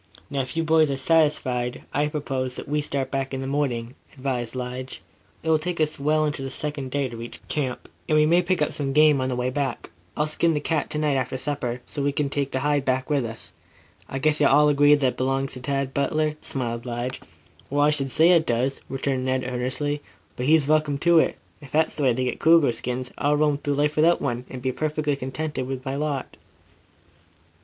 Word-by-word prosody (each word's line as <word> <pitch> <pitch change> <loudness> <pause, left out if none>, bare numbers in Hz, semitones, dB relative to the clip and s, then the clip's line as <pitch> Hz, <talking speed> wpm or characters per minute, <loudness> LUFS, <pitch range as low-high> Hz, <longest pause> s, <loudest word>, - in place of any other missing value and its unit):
"Now, 140 -1 0
if 130 +5 -4
you 165 - +2
boys 160 -1 +4
are 135 - -1
satisfied, 130 -5 +1
I 145 +1 +2
propose 135 -4 -3
that - - -7
we 150 +1 0
start 140 -2 -2
back 135 -1 -2
in 135 - -4
the - - -4
morning," 130 -4 -1 0.2
advised 130 -3 -3
Lige. 125 +1 -5 0.4
"It 160 - -2
will 155 - +4
take 175 +2 -3
us 155 -1 0
well 155 +2 +2
into 145 -2 -2
the 135 - -4
second 145 -1 -4
day 140 0 0
to 120 - -8
reach 115 +1 -6
camp, 130 -5 -2 0.2
and 155 - +4
we 150 - +5
may 170 +3 +4
pick 180 -3 +1
up - - -2
some 135 -2 -2
game 150 -2 +5
on 130 - -1
the 125 - -1
way 125 +1 -1
back. 135 -2 -3 0.3
I'll 150 - +2
skin 160 +1 +1
the - - +1
cat 155 0 -1
to - - -2
night 150 -2 +1
after 130 0 -2
supper, 125 -4 -3
so 145 - -5
we 140 +1 +1
can 140 -1 -1
take 140 -1 -1
the 130 - -2
hide 145 -1 +1
back 130 +2 -1
with 140 -3 +2
us. 115 -1 -7 0.6
I 135 - -3
guess 155 +2 +2
you'll 145 - +6
all 150 +2 +5
agree 145 0 +6
that 145 -2 0
it 125 - -2
belongs 135 +1 0
to 130 - -7
Tad 135 0 -2
Butler?" 155 +2 0
smiled 120 -2 -3
Lige. 120 +2 -4 0.5
"Well, 145 +1 +1
I 150 - +4
should 140 -2 -1
say 160 +5 +5
it 165 -2 +4
does," 125 +3 0
returned 135 -1 -1
Ned 130 0 0
earnestly. 130 +4 -2 0.3
"But 125 - -3
he's 155 -1 +5
welcome 155 -2 +2
to 170 +2 +5
it. - - +1 0.2
If 140 - -12
that's 160 +1 +2
the - - -3
way 130 -3 +4
they 130 +2 -1
get 125 - -2
cougar 160 -5 +5
skins, 125 +2 -4
I'll 145 +1 +2
roam 150 -1 +2
through 145 -1 -1
life 150 +1 +1
without 165 +3 +4
one, 125 -2 -2
and 125 -1 -8
be 130 - +1
perfectly 150 +1 -1
contented 135 +1 -4
with 130 0 -5
my 135 +1 -2
lot." 145 -2 -3
140 Hz, 230 wpm, -24 LUFS, 130-150 Hz, 0.6 s, you'll